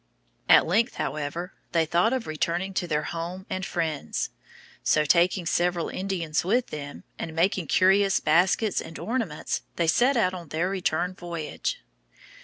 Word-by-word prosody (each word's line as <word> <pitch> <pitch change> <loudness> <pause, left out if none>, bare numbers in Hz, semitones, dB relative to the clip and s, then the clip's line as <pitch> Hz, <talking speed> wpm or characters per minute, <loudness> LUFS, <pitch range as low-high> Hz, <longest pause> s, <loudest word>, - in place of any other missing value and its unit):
At - - +8
length, 225 +9 +1
however, 150 +5 -3 0.2
they 165 -1 +3
thought 175 +7 +2
of 260 -3 -1
returning 170 +5 -2
to 180 -1 -1
their 150 -2 0
home 170 +4 -5
and 185 - -2
friends. 155 - -2 0.5
So, 155 0 +2
taking 175 +4 +3
several 175 +1 +1
Indians 180 -5 -2
with 235 +7 +1
them, 145 -1 -7 0.2
and 160 -1 -5
many 180 0 +1
curious 195 +2 +4
baskets 185 +6 +2
and 165 - -9
ornaments, 225 -10 -2
they 170 - +1
set 245 +11 +3
out 185 -5 +2
on 175 -3 -7
their 165 +5 -1
return 180 -1 0
voyage. 175 - -4
175 Hz, 150 wpm, -26 LUFS, 160-190 Hz, 0.5 s, At